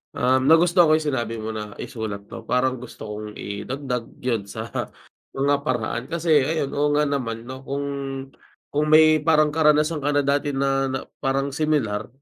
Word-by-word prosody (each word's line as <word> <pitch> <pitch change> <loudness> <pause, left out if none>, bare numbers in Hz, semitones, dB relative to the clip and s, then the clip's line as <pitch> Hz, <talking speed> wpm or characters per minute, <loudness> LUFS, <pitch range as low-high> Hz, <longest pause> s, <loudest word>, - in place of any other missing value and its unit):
um, 130 +1 +3
nagustohan 170 +2 +6
ko 155 - +5
yung 155 -1 0
sinabi 120 -3 -2
mo 110 - -3
na 105 -1 -6
isulat 105 -3 -5
'to. 115 +2 -10
Parang 130 0 +1
gusto 125 - -10
kong 105 0 -7
idagdag 125 +4 -4 0.2
yun 115 -5 -1
sa 110 +2 -7 0.6
mga 140 +1 +2
paraan. 120 -2 -2
Kasi 165 -1 -1
ayun, 145 0 -1
oo 145 +1 +1
nga 150 - +3
naman, 120 -6 -2
'no? 130 +2 -8
Kung 140 +1 -2 0.9
kung 150 +1 +1
may 155 0 +6
parang 155 -1 +3
karanasan 150 0 +3
ka 145 +1 -1
na 145 - +3
dati 140 0 0
na 135 0 +1
na 130 0 -2 0.2
parang 135 0 0
similar, 140 -9 0
135 Hz, 170 wpm, -23 LUFS, 115-150 Hz, 0.9 s, nagustohan